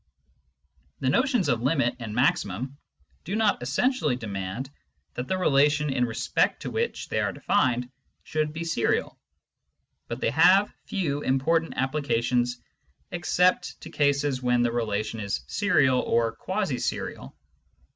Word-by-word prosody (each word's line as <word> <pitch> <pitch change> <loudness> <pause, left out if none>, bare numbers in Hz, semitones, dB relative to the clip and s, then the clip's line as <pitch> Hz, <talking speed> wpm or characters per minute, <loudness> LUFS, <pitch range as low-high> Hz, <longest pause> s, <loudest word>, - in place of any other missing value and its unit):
The 130 - +1
notions 250 - +2
of 120 -4 +1
limit 135 -2 +1
and 110 -3 -6
maximum 125 +1 0 0.4
do 195 - -3
not 215 - +2
essentially 150 - +1
demand 105 +2 -5 0.4
that 125 +1 -5
the 190 - 0
relation 150 -3 +3
in 125 - +2
respect 115 -1 0
to - - -4
which 465 +1 -2
they - - 0
are - - 0
defined 125 -9 +1 0.4
should 155 -1 -1
be 165 +2 -5
serial, 165 -7 0 0.9
but - - -5
they - - 0
have 185 - +5
few 145 -7 -1
important 160 +5 +1
applications 125 -3 0 0.5
except 180 +1 +1
to - - -9
cases 140 -2 +1
when 125 -1 +2
the 120 - +1
relation 110 -1 -2
is 100 -11 -3
serial 130 - +2
or 115 -2 +1
quasi - - -2
serial. - - -4
135 Hz, 135 wpm, -26 LUFS, 120-165 Hz, 0.9 s, have